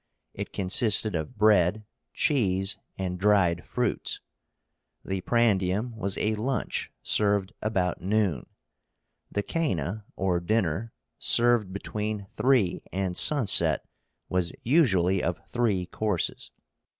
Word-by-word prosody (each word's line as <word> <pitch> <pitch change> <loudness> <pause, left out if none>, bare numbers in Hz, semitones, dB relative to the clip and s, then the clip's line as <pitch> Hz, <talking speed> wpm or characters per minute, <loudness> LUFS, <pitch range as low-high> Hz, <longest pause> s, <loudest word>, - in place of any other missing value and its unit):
It - - -6
consisted 105 +2 +3
of 80 +4 -4
bread, 105 -1 +3 0.3
cheese, 100 -7 +1 0.2
and 90 -1 -3
dried 95 -4 +3
fruits. - - -2 0.9
The 95 -1 -3
prandium 110 0 +1
was 100 -3 -3
a 110 - 0
lunch 125 +5 -2
served 100 0 +1
about 95 -5 -1
noon. 95 - 0 0.8
The 100 - -1
coena, 105 - -2
or 90 -2 0
dinner, 100 +2 -1 0.3
served 120 -5 +2
between 105 +1 -4
three 125 -9 +2
and 95 -1 -2
sunset, 90 - +3 0.4
was 90 -2 -1
usually 95 - +3
of 85 0 -1
three 110 -7 0
courses. 100 -1 -2
100 Hz, 105 wpm, -27 LUFS, 90-110 Hz, 0.9 s, consisted